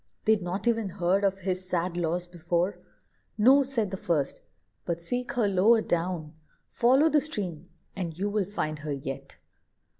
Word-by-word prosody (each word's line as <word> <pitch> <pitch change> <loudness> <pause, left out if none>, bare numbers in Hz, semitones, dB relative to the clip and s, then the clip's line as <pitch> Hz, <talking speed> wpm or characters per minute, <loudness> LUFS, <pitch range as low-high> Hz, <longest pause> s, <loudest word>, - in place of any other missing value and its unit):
They'd 220 -2 +4
not 185 +5 -3
e'en 225 -4 +1
heard 185 +2 +1
of 195 -1 +1
his 185 0 -3
sad 175 0 -1
loss 175 +1 -1
before. 175 +2 -1 0.6
"No," 260 +6 +6
said 245 -7 -1
the 190 - -3
first; 165 -8 -1 0.4
"but 170 -1 -2
seek 245 +10 -3
her 235 -4 +2
lower 205 +4 +4
down: 170 -2 -2 0.4
Follow 260 +6 +4
the 305 -2 +4
stream, 185 - -4 0.3
and 170 -4 -4
you 200 +3 -1
will 205 -1 0
find 155 -6 -3
her 150 -1 -3
yet." 135 -1 -6
185 Hz, 160 wpm, -28 LUFS, 170-215 Hz, 0.6 s, No